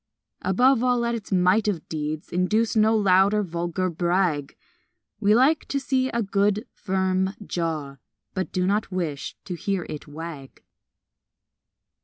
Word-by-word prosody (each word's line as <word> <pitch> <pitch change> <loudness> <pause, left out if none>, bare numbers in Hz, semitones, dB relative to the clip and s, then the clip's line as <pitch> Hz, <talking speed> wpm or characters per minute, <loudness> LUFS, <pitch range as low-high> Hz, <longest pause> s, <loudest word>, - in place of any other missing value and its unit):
Above 245 +6 +3
all, 250 -1 +3
let 235 0 0
its 225 -3 -6
might 185 +3 +3
of 185 -6 -2
deeds 155 0 -4
Induce 215 +7 +1
no 220 +1 +4
loud 195 0 +4
or 210 - +2
vulgar 175 +1 -2
brag 170 -4 0 0.6
We 210 +1 +4
like 280 +6 +3
to 280 - -1
see 260 -1 0
a 235 -2 -1
good, 200 +1 +1
firm 190 0 0
jaw, 155 -6 -3 0.4
But 185 -1 -3
do 180 -1 0
not 200 +2 0
wish 165 -6 -3
to 185 - -4
hear 185 +1 -2
it 150 - -7
wag. 150 -2 -9
190 Hz, 145 wpm, -24 LUFS, 170-215 Hz, 0.6 s, no